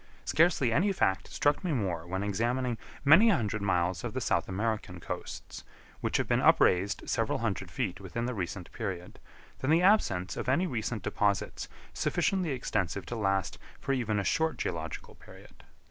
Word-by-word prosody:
Scarcely 155 Hz, -8 st, +3 dB
any 200 Hz, -, +3 dB
fact 95 Hz, -, +1 dB
struck 145 Hz, +5 st, +1 dB
me 175 Hz, -4 st, 0 dB
more 90 Hz, -, -2 dB
when 95 Hz, +2 st, -2 dB
examining 120 Hz, +4 st, -1 dB, 0.3 s
many 175 Hz, +11 st, +8 dB
hundred 110 Hz, -, +1 dB
miles 90 Hz, -2 st, 0 dB
of -, -, -5 dB
the -, -, 0 dB
South -, -, 0 dB
American 110 Hz, +3 st, -2 dB
coasts, -, -, -7 dB, 0.4 s
which -, -, 0 dB
have -, -, -1 dB
been -, -, +2 dB
upraised 95 Hz, +3 st, +3 dB
several 115 Hz, -1 st, 0 dB
hundred 100 Hz, -5 st, -2 dB
feet 95 Hz, 0 st, -3 dB
within 100 Hz, +5 st, -4 dB
the 125 Hz, -, -2 dB
recent 90 Hz, -3 st, -5 dB
period, 95 Hz, -6 st, -5 dB, 0.4 s
than 130 Hz, -, -2 dB
the 165 Hz, +3 st, +4 dB
absence 100 Hz, -, +3 dB
of -, -, -3 dB
any 150 Hz, +8 st, +3 dB
recent 115 Hz, -, -3 dB
deposits 100 Hz, -2 st, -1 dB, 0.3 s
sufficiently 185 Hz, -4 st, 0 dB
extensive 100 Hz, -, -2 dB
to 120 Hz, -, -5 dB
last 95 Hz, -4 st, 0 dB, 0.2 s
for 135 Hz, -, -1 dB
even 115 Hz, -5 st, 0 dB
a 100 Hz, -, 0 dB
short 160 Hz, +8 st, +1 dB
geological 80 Hz, -2 st, -4 dB
period. -, -, -16 dB
110 Hz, 165 wpm, -30 LUFS, 95-130 Hz, 0.4 s, many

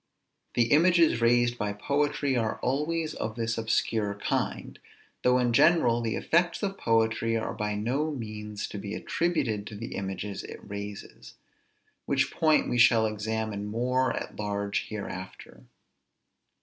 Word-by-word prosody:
The 115 Hz, -1 st, +2 dB
images 165 Hz, -5 st, +5 dB
raised 120 Hz, 0 st, +3 dB
by 105 Hz, -2 st, -1 dB
poetry 140 Hz, +4 st, 0 dB
are 115 Hz, -3 st, 0 dB
always 155 Hz, +5 st, -1 dB
of 110 Hz, 0 st, -4 dB
this 115 Hz, -1 st, -1 dB
obscure 110 Hz, -2 st, 0 dB
kind; 100 Hz, -, -3 dB, 0.4 s
though 125 Hz, 0 st, +4 dB
in 120 Hz, -1 st, +1 dB
general 125 Hz, -4 st, +4 dB
the 115 Hz, -2 st, -1 dB
effects 170 Hz, +3 st, +1 dB
of 195 Hz, -1 st, -2 dB
poetry 115 Hz, 0 st, +1 dB
are 110 Hz, -, -3 dB
by 105 Hz, 0 st, -2 dB
no 130 Hz, +9 st, -1 dB
means 105 Hz, -6 st, -5 dB
to 105 Hz, -, -6 dB
be 100 Hz, +1 st, -5 dB
attributed 135 Hz, -12 st, -1 dB
to 110 Hz, -, -8 dB
the 115 Hz, +3 st, -6 dB
images 95 Hz, +1 st, -4 dB
it -, -, -8 dB
raises; 100 Hz, 0 st, -8 dB, 0.7 s
which -, -, +1 dB
point 155 Hz, -1 st, +3 dB
we 120 Hz, -, 0 dB
shall 115 Hz, -2 st, +6 dB
examine 110 Hz, -1 st, -3 dB
more 125 Hz, +4 st, +1 dB
at -, -, -6 dB
large 100 Hz, -1 st, -2 dB
hereafter. 95 Hz, -3 st, -8 dB
115 Hz, 140 wpm, -28 LUFS, 105-130 Hz, 0.7 s, shall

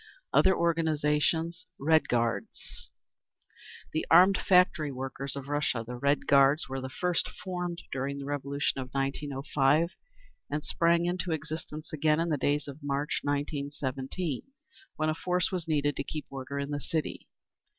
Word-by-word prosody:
Other 190 Hz, 0 st, +5 dB
Organisations 160 Hz, +1 st, +1 dB
Red 155 Hz, +3 st, +3 dB
Guards. 115 Hz, -1 st, -2 dB, 1.0 s
The 155 Hz, -, 0 dB
armed 185 Hz, +4 st, +7 dB
factory 180 Hz, -5 st, +4 dB
workers 135 Hz, +1 st, -5 dB
of 140 Hz, -1 st, -6 dB
Russia. 145 Hz, -5 st, 0 dB
The 125 Hz, +2 st, -6 dB
Red 140 Hz, +3 st, +1 dB
Guards 140 Hz, +2 st, +5 dB
were 135 Hz, 0 st, -4 dB
first 180 Hz, +5 st, -1 dB
formed 180 Hz, -2 st, -5 dB
during 140 Hz, +1 st, -2 dB
the 140 Hz, -, -6 dB
Revolution 140 Hz, -1 st, -1 dB
of 130 Hz, -, -7 dB
1905, 140 Hz, +3 st, +1 dB, 0.5 s
and 150 Hz, +1 st, -3 dB
sprang 170 Hz, 0 st, +2 dB
into 175 Hz, -1 st, -1 dB
existence 155 Hz, 0 st, -6 dB
again 155 Hz, +1 st, +2 dB
in 170 Hz, +1 st, 0 dB
the 150 Hz, -, +1 dB
days 145 Hz, +2 st, 0 dB
of 140 Hz, +2 st, -9 dB
March, 145 Hz, +1 st, -1 dB
1917, 145 Hz, +1 st, -2 dB, 0.5 s
when 155 Hz, 0 st, 0 dB
a -, -, +2 dB
force 180 Hz, +3 st, 0 dB
was 180 Hz, -3 st, -3 dB
needed 145 Hz, -2 st, +1 dB
to -, -, -1 dB
keep 150 Hz, +2 st, -5 dB
order 135 Hz, +1 st, -5 dB
in 140 Hz, +1 st, -3 dB
the 145 Hz, 0 st, -2 dB
city. 155 Hz, +4 st, -3 dB
150 Hz, 145 wpm, -29 LUFS, 140-165 Hz, 1.0 s, armed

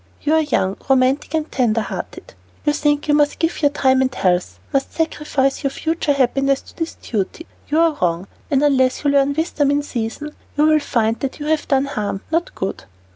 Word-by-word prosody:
You 300 Hz, -, +2 dB
are 320 Hz, -, +5 dB
young, 200 Hz, -10 st, 0 dB
romantic, 265 Hz, +3 st, +2 dB
and 315 Hz, 0 st, -2 dB
tender 230 Hz, -3 st, +1 dB
hearted. -, -, -7 dB, 0.3 s
You 295 Hz, -, +3 dB
think 295 Hz, 0 st, +1 dB
you 295 Hz, -, +3 dB
must 295 Hz, 0 st, +3 dB
give 330 Hz, 0 st, -1 dB
your 290 Hz, -, +5 dB
time 265 Hz, -2 st, +2 dB
and 260 Hz, 0 st, +1 dB
health, 180 Hz, -4 st, 0 dB, 0.2 s
must 275 Hz, -1 st, 0 dB
sacrifice 300 Hz, -4 st, 0 dB
your 275 Hz, -, +2 dB
future 315 Hz, +1 st, -1 dB
happiness 275 Hz, +1 st, +2 dB
to -, -, -17 dB
this 325 Hz, -1 st, -4 dB
duty. 220 Hz, -, -4 dB, 0.2 s
You 305 Hz, +2 st, +1 dB
are 330 Hz, -2 st, +3 dB
wrong, 175 Hz, +1 st, 0 dB, 0.2 s
and 280 Hz, -2 st, +2 dB
unless 260 Hz, -3 st, +2 dB
you 285 Hz, -, +3 dB
learn 280 Hz, 0 st, +3 dB
wisdom 315 Hz, -3 st, 0 dB
in 290 Hz, +1 st, +1 dB
season, 250 Hz, +3 st, -4 dB, 0.3 s
you 300 Hz, -, +4 dB
will 310 Hz, 0 st, +5 dB
find 225 Hz, -5 st, 0 dB
that 275 Hz, +1 st, -4 dB
you 295 Hz, -, -5 dB
have 310 Hz, 0 st, 0 dB
done 270 Hz, -1 st, +2 dB
harm, 210 Hz, -8 st, -3 dB
not 335 Hz, +2 st, -1 dB
good." 190 Hz, -, -4 dB
280 Hz, 200 wpm, -20 LUFS, 255-300 Hz, 0.3 s, are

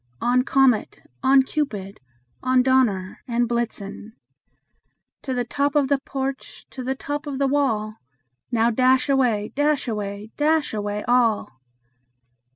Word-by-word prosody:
On! 250 Hz, +1 st, +2 dB
Comet, 265 Hz, -4 st, +2 dB, 0.2 s
on! 265 Hz, 0 st, +5 dB
Cupid, 215 Hz, -10 st, -4 dB, 0.4 s
on! 255 Hz, -1 st, +3 dB
Dunder 235 Hz, -8 st, +1 dB
and 240 Hz, 0 st, +1 dB
Blitzen 225 Hz, -2 st, -4 dB, 1.1 s
To 265 Hz, -, -5 dB
the 245 Hz, -, 0 dB
top 280 Hz, +4 st, -1 dB
of 285 Hz, -2 st, +3 dB
the 280 Hz, -1 st, +2 dB
porch, 270 Hz, -1 st, -5 dB
to 260 Hz, -, -7 dB
the 265 Hz, +2 st, -2 dB
top 290 Hz, +2 st, -5 dB
of 280 Hz, -2 st, -4 dB
the 275 Hz, -, +1 dB
wall! 225 Hz, -7 st, 0 dB, 0.5 s
Now, 230 Hz, 0 st, +2 dB
dash 255 Hz, +4 st, +3 dB
away, 240 Hz, -6 st, +1 dB
dash 290 Hz, -1 st, +1 dB
away, 210 Hz, -1 st, -4 dB
dash 305 Hz, -1 st, +1 dB
away 210 Hz, 0 st, -3 dB
all!" 230 Hz, -, +1 dB
250 Hz, 135 wpm, -23 LUFS, 215-275 Hz, 1.1 s, on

